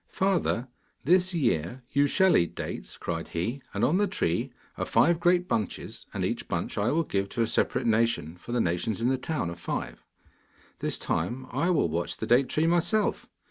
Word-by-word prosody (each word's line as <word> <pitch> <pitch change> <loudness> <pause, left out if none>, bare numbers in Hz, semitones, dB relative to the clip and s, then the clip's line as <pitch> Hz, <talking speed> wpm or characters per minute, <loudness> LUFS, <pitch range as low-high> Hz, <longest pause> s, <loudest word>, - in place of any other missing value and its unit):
'Father, 185 -10 0 0.4
this 180 +5 +3
year 120 - 0
you 140 +1 +3
shall 190 +5 +4
eat 85 - +2
dates,' - - -6
cried 85 -1 -4
he. 115 +12 -3
'And - - -2
on 160 +7 +3
the 205 +1 +2
tree 85 - -1 0.2
are - - -2
five 170 +1 +4
great 175 +1 +3
bunches, 105 - -3
and - - -2
each - - -3
bunch - - -2
I 105 +3 +1
will 165 +4 +2
give 100 -8 -2
to 115 - 0
a - - +2
separate 110 - 0
nation, 115 -8 +1
for 90 - -10
the 120 - +1
nations 90 +5 -1
in 120 +2 +1
the 130 - +2
town 150 - -2
are - - -6
five. 85 - -5 0.8
This - - -1
time, 120 +11 -2
I 145 +8 +1
will 165 - +3
watch 85 +2 -2
the - - -3
date 125 +3 +4
tree 155 - +1
myself. 175 +6 +1
125 Hz, 195 wpm, -28 LUFS, -, 0.8 s, shall